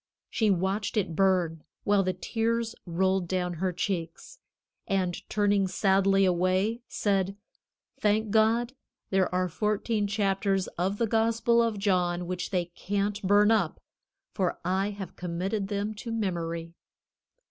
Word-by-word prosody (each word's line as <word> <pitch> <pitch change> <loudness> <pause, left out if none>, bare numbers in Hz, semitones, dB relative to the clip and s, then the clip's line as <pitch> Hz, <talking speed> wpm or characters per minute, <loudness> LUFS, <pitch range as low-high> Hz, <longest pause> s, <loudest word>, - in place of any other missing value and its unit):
She 220 -2 +2
watched 195 +3 0
it 185 -6 0
burn, 180 -4 +2 0.2
while 205 -1 +3
the 185 -1 0
tears 230 +4 -1
rolled 185 +1 +1
down 180 -1 -1
her 185 -1 +1
cheeks, 180 - -4 0.5
and 185 -2 0 0.2
turning 205 -2 +2
sadly 195 0 +3
away, 185 +6 +1
said: 195 -1 0 0.6
"Thank 215 -2 +1
God, 225 +3 +3 0.4
there 190 -1 +2
are 185 0 +1
fourteen 210 +3 0
chapters 195 -2 +1
of 190 +4 -2
the 230 - +1
Gospel 230 +1 +2
of 230 -2 0
John 180 -3 +1
which 180 +1 -3
they 180 -3 0
can't 205 +2 -2
burn 205 +2 +4
up, 200 -8 +1 0.5
for 185 -4 0
I 190 +2 +1
have 200 -3 -7
committed 185 +4 -2
them 205 +1 -2
to 230 +2 -7
memory." 170 -6 -3
195 Hz, 135 wpm, -28 LUFS, 185-210 Hz, 0.6 s, burn